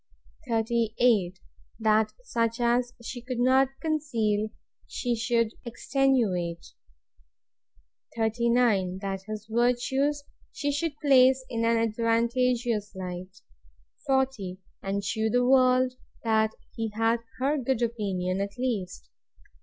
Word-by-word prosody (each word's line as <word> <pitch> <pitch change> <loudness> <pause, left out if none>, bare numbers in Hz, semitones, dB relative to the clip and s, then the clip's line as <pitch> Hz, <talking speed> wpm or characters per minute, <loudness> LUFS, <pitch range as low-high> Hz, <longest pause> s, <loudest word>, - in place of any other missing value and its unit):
38. 225 -4 +1 0.4
That 215 -1 +3
such 230 - -1
as 240 +1 +2
she 245 +1 -6
could 250 0 -5
not 260 +2 +4
conceal, 230 -10 0 0.4
she 245 -2 -2
should 230 -1 +1
extenuate. 235 -9 0 1.5
39. 225 -4 +2
That 195 -1 -4
his 215 -1 -6
virtues 250 +5 +1 0.3
she 290 0 -2
should 290 +1 -2
place 260 -2 +5
in 230 -1 -1
an 230 0 +3
advantageous 230 -1 0
light 185 0 -7 0.7
40. 265 -9 0 0.2
And 200 +1 -2
shew 220 +3 0
the 245 +2 +2
world, 255 0 +4 0.3
that 220 -1 +2 0.2
he 225 -1 -3
had 225 +1 +2 0.2
HER 280 +3 +1
good 255 -1 0
opinion 195 -5 -1
at 200 0 -4
least. 210 - -3
230 Hz, 105 wpm, -27 LUFS, 215-255 Hz, 1.5 s, place